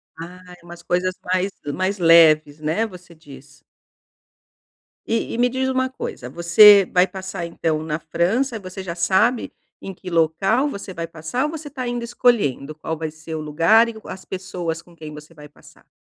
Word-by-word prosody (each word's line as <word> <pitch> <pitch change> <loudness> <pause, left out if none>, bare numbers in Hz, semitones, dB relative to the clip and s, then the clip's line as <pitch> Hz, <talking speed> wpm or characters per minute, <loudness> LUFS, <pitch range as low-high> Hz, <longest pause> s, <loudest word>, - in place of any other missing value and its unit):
Ah, 180 +2 -11
é - - -21
umas 175 0 -11
coisas 180 +1 -1 0.2
mais 185 +2 0 0.2
mais 190 +2 -1
leves, 155 -3 +5
né? 160 +9 -1
Você 180 -4 -12
diz. 140 -2 -16 1.4
E 230 - -2
e - - -3
me 245 +1 +3
diz 260 +1 -1
uma 260 0 0
coisa. 125 - -7
Você 180 +5 +7
vai 180 +1 +4
passar 190 -3 -6
então 160 -2 -2
na 155 0 -3
França, 215 +10 -1
você 185 0 -8
já 170 -2 -5
sabe 190 +8 +1 0.3
em 195 - -7
que 180 +1 -10
local 185 - +1
você 200 -5 -7
vai 165 -1 -5
passar 165 - -3
ou 300 - -3
você 310 -2 -7
tá 260 -2 -6
ainda 240 -1 -3
escolhendo 215 - 0
qual 160 +1 -5
vai 160 -1 -4
ser 160 +1 -8
o 155 - -4
lugar 165 +10 +4
e - - -4
o - - -12
as 185 - -9
pessoas 175 -3 -5
com 175 -1 -21
quem 155 -2 -10
você 150 +2 -12
vai 150 -1 -13
passar? 145 - -21
180 Hz, 185 wpm, -21 LUFS, 160-215 Hz, 1.4 s, Você